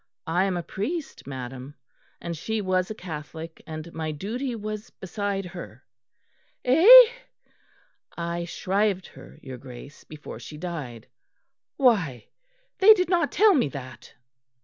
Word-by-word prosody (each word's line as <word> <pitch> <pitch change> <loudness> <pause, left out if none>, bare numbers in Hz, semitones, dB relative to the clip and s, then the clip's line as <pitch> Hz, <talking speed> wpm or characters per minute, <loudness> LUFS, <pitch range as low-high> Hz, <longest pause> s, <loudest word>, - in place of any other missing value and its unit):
"I 175 +4 +1
am 190 -2 -1
a 175 - -3
priest, 290 - -5
madam, 130 +1 -7 0.4
and 170 0 -5
she 220 +8 -3
was 185 -2 0
a 215 - -5
Catholic, 160 -2 -8
and 160 +1 -7
my 160 -1 -3
duty 235 - -4
was 215 -1 -6
beside 195 +1 -4
her." 175 - -10 0.8
"Eh?" 375 - +10 1.1
"I 170 0 -3
shrived 195 +2 -1
her, - - -14
your 130 -2 -8
Grace, 130 +3 -12
before 155 -1 -10
she 150 - -10
died." 150 -10 -6 0.7
"Why! 180 - +2 0.5
they 430 +3 +9
did 365 -3 -1
not 345 -5 +2
tell 425 0 +5
me 260 - +2
that." 130 -2 -10
180 Hz, 130 wpm, -25 LUFS, 150-220 Hz, 1.1 s, Eh